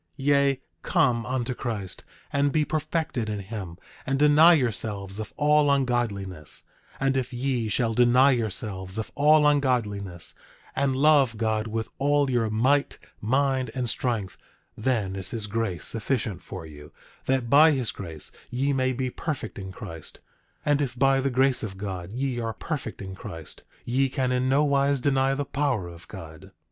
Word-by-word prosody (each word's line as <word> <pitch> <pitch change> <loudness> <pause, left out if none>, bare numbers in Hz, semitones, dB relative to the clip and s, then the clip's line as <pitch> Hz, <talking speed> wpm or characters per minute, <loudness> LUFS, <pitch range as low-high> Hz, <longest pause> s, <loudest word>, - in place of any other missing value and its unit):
10:32 - - -49 0.2
Yea, 140 -2 +3 0.2
come 125 - +2
unto 130 -1 -1
Christ, 110 -7 -5 0.3
and 140 0 +2
be 155 0 +2
perfected 155 -7 -2
in 105 - -2
him, 95 -4 -6 0.3
and 135 +1 0
deny 150 +4 +7
yourselves 105 - -2
of 110 - -5
all 150 0 +4
ungodliness; 115 - -1 0.4
and 135 0 +1
if 130 0 -1
ye 125 -3 -1
shall 115 +1 +1
deny 125 +4 +5
yourselves 100 -5 -3
of 110 - -4
all 150 +1 +5
ungodliness 105 - +1 0.4
and 135 -1 +1
love 140 -5 +4
God 110 0 0
with 110 0 -3
all 145 0 +2
your 115 -3 +1
might, 130 +7 +2 0.2
mind 130 +2 +1
and 125 -2 -1
strength, 115 -6 -2 0.4
then 110 -5 -1
is 95 -1 -5
his 110 -2 -3
grace 105 -4 -2
sufficient 110 -4 -2
for 80 - -8
you, 75 -1 -12 0.4
that 130 -2 +1
by 145 +6 +7
his 130 -6 0
grace 80 -6 -7 0.2
ye 135 +3 0
may 130 -1 +1
be 130 0 -2
perfect 135 -10 -4
in 95 -1 -6
Christ; 80 -3 -8 0.5
and 145 0 +3
if 125 -3 -2
by 135 +1 +4
the 135 - +1
grace 130 0 +2
of 95 -4 -5
God 95 -2 -5
ye 125 +1 -2
are 115 -1 -2
perfect 135 -9 -5
in 95 0 -7
Christ, 80 -4 -8 0.2
ye 135 +3 +1
can 130 -1 -1
in 125 +1 +1
nowise 140 0 +3
deny 135 0 +2
the 145 +1 -2
power 135 -11 -1
of 85 0 -12
God. 80 +4 -10
125 Hz, 165 wpm, -26 LUFS, 105-140 Hz, 0.5 s, deny